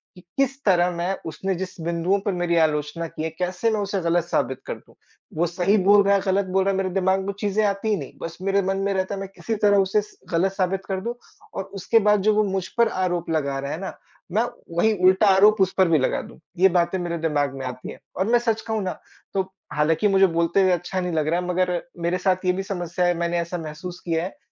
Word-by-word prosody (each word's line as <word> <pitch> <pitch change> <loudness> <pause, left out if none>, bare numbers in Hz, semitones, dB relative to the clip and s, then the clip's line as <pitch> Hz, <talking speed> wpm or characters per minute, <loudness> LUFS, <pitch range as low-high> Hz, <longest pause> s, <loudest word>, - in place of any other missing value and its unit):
कि 180 - -14 0.2
किस 275 0 0
तरह 180 -3 +4
मैं 175 +2 -2
उसने 190 +4 -3
जिस 185 +1 -5
बिंदुओं 170 +4 0
पर 205 - -1
मेरी 175 -1 0
आलोचना 155 +1 0
की 155 - -6
है, 160 - -1
कैसे 180 +6 -1
मैं 215 - 0
उसे 200 -1 -1
गलत 170 0 +1
साबित 130 -6 -1
कर - - -4
दूँ। - - -20 0.4
वो 170 - +3
सही 180 +4 +2
बोल 200 +1 +6
रहा 200 0 +4
है, 200 - +2
गलत 195 +1 +2
बोल 190 +1 +1
रहा 195 - +3
है, 190 - -1
मेरे 190 -1 0
दिमाग़ 190 0 +2
में 200 - -2
चीज़ें 210 +1 +1
आती 200 +2 -1
ही 215 - +3
नहीं, 140 -6 -7
बस 165 0 -6
मेरे 195 +1 +2
मन 195 0 -1
में 195 0 0
रहता 190 +1 -1
है - - -6
मैं 195 - -6
किसी 225 - -3
तरह 205 -1 +3
उसे 195 +2 +3
स 210 - -16
गलत 180 +3 +2
साबित 190 0 -1
कर 190 -1 -2
दूँ 235 +4 -3 0.4
और 195 - -3 0.2
उसके 225 +4 +3
बाद 210 -1 +4
जो 215 +2 +3
वो 215 - +4
मुझ 190 -2 -2
पर 235 0 +5 0.2
आरोप 175 -2 -2
लगा 140 -4 0
रहे 140 +1 -4
है - - -3
ना, 190 - -6 0.3
मैं 215 +5 +2 0.3
वहीं 220 +6 +4
उल्टा 190 +3 +5
आरोप 210 +2 +5
उस 190 -1 +2
पर 190 -1 +5
भी 165 - +4
लगा 130 - 0
दूँ। - - -13 0.2
ये 190 +1 +6
बातें 175 +1 +1
मेरे 170 -1 -3
दिमाग़ 150 -4 0
में 135 -1 -5
आती 125 0 -6
हैं - - -12 0.2
और 190 - 0
मैं 240 - +5
सच 225 -2 0
कहूँ 220 -2 -2
ना, 185 - -4 0.3
तो 195 - +2 0.3
हालाँकि 160 +7 +2
मुझे 195 -1 +5
बोलते 170 +2 +1
हुए 185 - +4
अच्छा 180 +2 -1
नहीं 180 -1 -3
लग 155 -2 0
रहा 170 +3 +1
है 180 - -4
मगर 180 -1 0 0.2
मेरे 170 +2 0
साथ 185 0 0
ये 180 - +4
भी 190 +1 -3
समस्या 180 -2 -2
है, 175 - +3
मैंने 170 0 -1
ऐसा 170 +1 -3
महसूस 165 +3 -7
किया 165 -1 0
है 190 +9 -6
185 Hz, 255 wpm, -23 LUFS, 170-195 Hz, 0.4 s, बोल